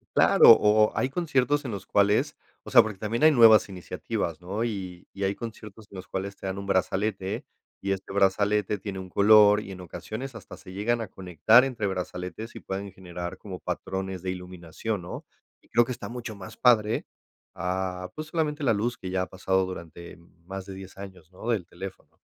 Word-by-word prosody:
Claro, - - +8
o 105 0 +5
o - - -16
hay 130 - +1
conciertos 145 -2 +1
en 125 - -3
los 100 -2 -6
cuales, 100 +1 +2 0.3
o - - -10
sea, - - +9
porque 105 -3 -5
también 110 +7 -2
hay 155 - +8
nuevas 115 -6 +7
iniciativas, 90 -2 -4
¿no? 100 +6 -3
Y 95 -6 -5
y 100 - -5
hay 95 +1 0
conciertos 110 -2 -9
en 100 - -12
los 95 - -9
cuales 100 +1 -4
te 95 - -7
dan 95 +1 -3
un 100 - -5
brazalete. 95 0 -1 0.4
Y 100 - -2
este 95 0 -7
brazalete 100 +1 +2
tiene 95 -1 -6
un 95 -1 -8
color, 105 +1 +6
y 100 - -9
en 95 - -9
ocasiones 110 +8 -7
hasta 100 - -10
se 95 -1 -12
llegan 115 +4 0
a 110 - -4
conectar 95 +7 +4
entre 120 -6 -2
brazaletes, 90 +4 -5
y - - -6
pueden 100 +1 -5
generar 90 0 -7
como 95 -3 -8
patrones 95 -1 -4
de 95 - -2
iluminación, 90 +3 -5
¿no? 90 - -7 0.4
Y - - -28
creo 120 +1 +4
que 130 - -5
está - - -8
mucho 120 -3 -6
más 95 -2 -10
padre, 115 -3 +3 0.5
ah, 90 +1 -3
pues, 155 0 -6
solamente 155 -2 -1
la 115 - +4
luz 120 +5 -1
que 95 - -7
ya 95 0 0
ha 95 - -2
pasado 95 0 0
durante 85 -2 -9 0.3
más 95 0 -6
de 95 - -8
10 95 0 -11
años, 95 -4 -11
¿no?, 95 +5 -10
del 105 -7 0
teléfono. 95 +2 -9
100 Hz, 200 wpm, -27 LUFS, 95-110 Hz, 0.5 s, sea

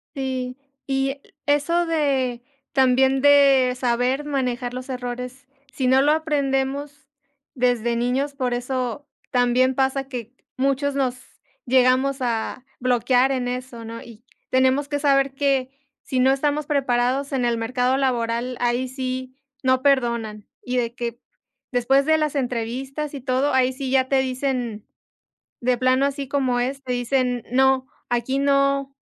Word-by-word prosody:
Sí. 260 -2 -3 0.3
Y 270 0 0
e 280 +1 -8 0.2
eso 295 +4 +2
de, 270 -7 0 0.3
también 265 0 +3
de 275 -3 +5
saber 250 +3 0
manejar 250 -4 -2
los 255 +1 -6
errores, 250 +1 -6 0.3
si 260 -2 -1
no 260 +1 +5
lo 295 +2 +4
aprendemos 280 -2 -1 0.5
desde 240 -2 +1
niños, 255 +4 0
por 255 -3 -1
eso 255 +3 -3 0.2
también 250 +1 +3
pasa 270 0 0
que 245 -4 -6 0.2
muchos 275 +1 0
nos 260 -3 0 0.5
llegamos 260 +2 +3
a 240 0 -2
bloquear 250 +1 +2
en 250 -2 -1
eso, 250 -2 -5
¿no?, 230 +1 -7
y 235 0 -14 0.3
tenemos 260 +2 +2
que 290 0 -1
saber 275 -1 +3
que 270 -2 +1 0.3
si 260 - -1
no 260 +1 +5
estamos 290 +2 0
preparados 270 0 0
en 260 -2 0
el 235 -1 +1
mercado 250 +3 0
laboral, 245 -2 -1
ahí 245 +1 +1
sí 255 0 -4 0.3
no 260 0 +3
perdonan, 235 -6 0 0.2
y 250 0 -3
de 235 -1 -1
que 235 -1 -4 0.5
después 260 +3 +3
de 315 0 +4
las 305 -1 -1
entrevistas 265 +4 -3
y 280 - -5
todo, 265 +2 +1
ahí 260 0 +3
sí 265 0 -5
ya 260 -1 +2
te 270 0 +3
dicen 255 -4 -2 0.7
de 250 +1 +1
plano 255 +2 +3
así 280 -1 -4
como 260 -3 0
es, 270 +3 -2
te 250 - -2
dicen: 245 0 0
"No, 265 +1 +3 0.2
aquí 245 +3 0
no, 275 0 +1
260 Hz, 145 wpm, -23 LUFS, 245-275 Hz, 0.7 s, de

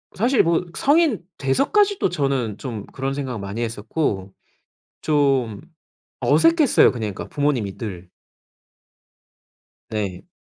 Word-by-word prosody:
사실 240 +5 +3
뭐 170 +1 +1
성인 290 - +3 0.2
돼서까지도 390 - +2
저는 135 - -1
좀 115 -6 -6
그런 135 0 -4
생각 130 -5 -4
많이 100 +4 -5
했었고 105 -3 -2 0.7
좀 135 -8 +1 0.6
어색했어요, 330 -4 +4
그냥 110 -5 -4
그러니까 - - -7
부모님이 135 -9 0
늘. 95 -6 -6 1.8
네. 100 -5 -4
135 Hz, 230 characters per minute, -22 LUFS, 105-170 Hz, 1.8 s, 어색했어요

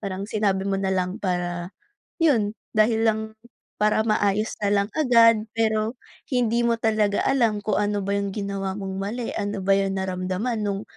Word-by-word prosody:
Parang 195 0 -4
sinabi 200 -3 0
mo 195 - 0
na 190 -1 0
lang 185 +1 -1
para 175 -2 -2 0.5
'yon, 230 -10 +3 0.3
dahil 220 +1 +4
lang 220 -1 +2 0.6
para 210 +1 +2
maayos 215 -1 0
na 205 -1 +1
lang 200 +1 +1
agad. 230 -6 +5
Pero 220 +1 0 0.4
hindi 235 -1 +2
mo 235 - +2
talaga 215 -2 +1
alam 230 -6 +2
kung 205 -1 0
ano 205 -1 0
ba 200 - -2
'yong 200 0 -1
ginawa 195 -2 -3
mong 195 -1 -5
mali? 225 +4 -3
Ano 205 -1 -3
ba 195 - +2
'yong 195 -1 0
naramdaman 190 +4 -2
no'ng, 200 -1 -2
205 Hz, 170 wpm, -24 LUFS, 195-220 Hz, 0.6 s, agad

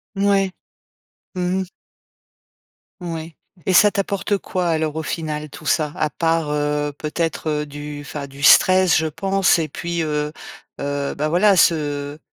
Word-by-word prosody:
Ouais. 195 -1 +2 0.8
Mmh 180 +1 0
mh. - - -1 1.4
Oui 165 -2 -6 0.3
et 190 - +1
ça 210 +3 +6
t'apporte 200 0 -1
quoi 185 -2 -2
alors 160 -2 0
au 160 - -3
final 155 -2 -4
tout 155 - -12
ça? 155 -1 +1
À 155 - +1
part, 165 -1 0
heu, 150 0 -1
peut-être, 160 +1 -2
heu, 150 0 -1
du 145 0 -7
enfin 145 -1 -6
du 140 +1 -11
stress, 185 +4 +6
je 160 - +1
pense 195 +3 +2
et 160 - -1
puis, 170 +3 -3
heu, 150 -1 -2 0.5
heu, 140 0 -2
ben 150 - -1
voilà, 190 +4 +4
ce 145 -3 +1
160 Hz, 150 wpm, -21 LUFS, 150-180 Hz, 1.4 s, ça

